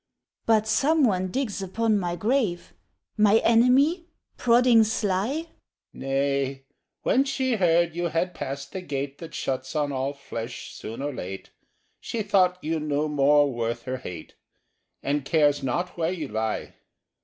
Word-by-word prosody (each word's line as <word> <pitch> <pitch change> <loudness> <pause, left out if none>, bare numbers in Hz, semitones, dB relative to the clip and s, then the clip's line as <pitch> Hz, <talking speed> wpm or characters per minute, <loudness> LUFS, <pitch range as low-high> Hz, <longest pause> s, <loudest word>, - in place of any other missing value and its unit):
'" - - -59
"But 220 -1 +3
some 285 +8 +3
one 185 -6 +2
digs 215 -1 -2
upon 215 +3 +1
my 175 -2 -2
grave? 210 -3 -1 0.4
My 210 0 +5
enemy?—prodding 250 -1 +3
sly?" 220 - -1 0.4
—"Nay: 135 0 -1 0.4
when 265 - +3
she 260 -3 0
heard 170 -2 +3
you 175 0 -1
had 170 +2 -1
passed 140 -1 -6
the 190 - -5
Gate 140 -4 -4
That 165 -2 -9
shuts 130 +2 -3
on 145 -1 0
all 135 +1 -2
flesh 120 -4 -7
soon 115 +5 -7
or 145 0 -2
late, 95 -4 -7 0.5
She 225 -2 -3
thought 185 -3 +3
you 160 +1 -1
no 150 0 -1
more 145 -1 +3
worth 115 0 -3
her 130 0 -3
hate, 90 -10 -9 0.7
And 145 0 0
cares 145 0 +2
not 175 +8 -2
where 165 +1 +1
you 180 -4 -4
lie." 110 0 -3
170 Hz, 145 wpm, -25 LUFS, 140-220 Hz, 0.7 s, My